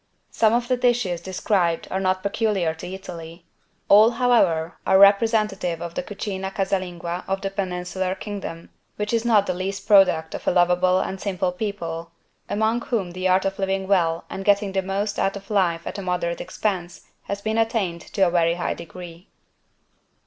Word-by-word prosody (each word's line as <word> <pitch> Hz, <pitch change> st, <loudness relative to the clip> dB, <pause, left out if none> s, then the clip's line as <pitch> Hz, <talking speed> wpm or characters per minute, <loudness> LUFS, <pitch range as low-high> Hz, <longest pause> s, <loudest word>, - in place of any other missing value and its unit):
Some 220 Hz, -1 st, +3 dB
of 240 Hz, 0 st, +1 dB
the 255 Hz, 0 st, +1 dB
dishes 240 Hz, -9 st, +1 dB
described 180 Hz, -2 st, 0 dB
are 190 Hz, -, 0 dB
not 185 Hz, 0 st, 0 dB
peculiar 200 Hz, -5 st, 0 dB
to 160 Hz, -, -9 dB
Italy. 170 Hz, -2 st, -9 dB, 0.4 s
All, 210 Hz, +3 st, +7 dB
however, 230 Hz, -10 st, +2 dB
are 190 Hz, -, +4 dB
representative 200 Hz, -3 st, +3 dB
of 170 Hz, 0 st, -6 dB
the -, -, -2 dB
=Cucina 190 Hz, 0 st, -5 dB
Casalinga= 180 Hz, -3 st, -2 dB
of 195 Hz, 0 st, -1 dB
the 195 Hz, -, -3 dB
peninsular 185 Hz, -1 st, -3 dB
Kingdom, 195 Hz, -5 st, -7 dB, 0.2 s
which 210 Hz, +2 st, -3 dB
is 230 Hz, 0 st, +1 dB
not 215 Hz, -4 st, +4 dB
the 185 Hz, -, -1 dB
least 195 Hz, +2 st, -4 dB
product 185 Hz, -6 st, +4 dB
of -, -, -7 dB
a -, -, +5 dB
lovable 180 Hz, +1 st, +3 dB
and 190 Hz, 0 st, -4 dB
simple 185 Hz, -2 st, -1 dB
people, 170 Hz, -4 st, -4 dB, 0.4 s
among 220 Hz, +3 st, +1 dB
whom 205 Hz, -9 st, -2 dB
the 185 Hz, +1 st, -2 dB
art 185 Hz, +1 st, +3 dB
of 195 Hz, 0 st, -2 dB
living 195 Hz, 0 st, -1 dB
well 170 Hz, -4 st, +1 dB
and 195 Hz, -, -6 dB
getting 200 Hz, 0 st, +2 dB
the 190 Hz, 0 st, 0 dB
most 200 Hz, +2 st, -2 dB
out 195 Hz, -, +1 dB
of 195 Hz, +1 st, -9 dB
life 170 Hz, -5 st, +1 dB
at 200 Hz, -, -5 dB
a -, -, -4 dB
moderate 180 Hz, -2 st, -2 dB
expense 180 Hz, -5 st, -3 dB, 0.2 s
has 200 Hz, 0 st, -5 dB
been 220 Hz, +1 st, 0 dB
attained 215 Hz, -7 st, 0 dB
to 195 Hz, -, -1 dB
a 175 Hz, -, +1 dB
very 170 Hz, -1 st, +2 dB
high 175 Hz, -, -2 dB
degree. 170 Hz, +1 st, -11 dB
190 Hz, 180 wpm, -23 LUFS, 175-205 Hz, 0.4 s, All